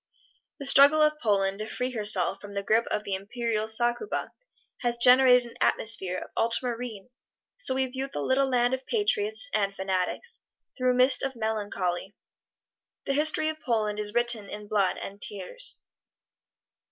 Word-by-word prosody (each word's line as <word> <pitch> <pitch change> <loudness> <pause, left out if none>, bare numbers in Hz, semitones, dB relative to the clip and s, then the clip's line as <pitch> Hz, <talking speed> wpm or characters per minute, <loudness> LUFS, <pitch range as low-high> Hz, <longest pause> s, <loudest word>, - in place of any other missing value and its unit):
The 280 - -6
struggle 280 +3 +6
of 305 0 +2
Poland 195 -3 0
to 215 - -5
free 250 +1 -3
herself 205 -5 +3
from 205 0 -10
the 200 0 -3
grip 225 +3 +1
of 210 - -2
the 200 -2 -4
imperial 220 +2 -3
succubi 240 - 0 0.5
has 240 -1 -2
generated 250 0 +6
an 235 - -13
atmosphere 190 -5 +2
of - - -8
ultramarine, 235 -2 -2 0.5
so 380 - +1
we 265 0 +1
view 260 +1 -5
the - - -5
little 265 - +1
land 245 0 +1
of 260 0 -4
patriots 425 +1 +1
(and 200 -1 0
fanatics) 190 - -2 0.4
through 255 -1 0
a - - -2
mist 255 0 +4
of 270 -1 -3
melancholy. 205 -4 -3 0.9
The 275 - -1
history 310 +2 +1
of 310 0 -6
Poland 215 -5 -1
is 210 0 -2
written 240 -4 +2
in 210 0 -8
blood 200 -3 +1
and 200 +1 -8
tears. 210 - -3
235 Hz, 160 wpm, -27 LUFS, 205-260 Hz, 0.9 s, struggle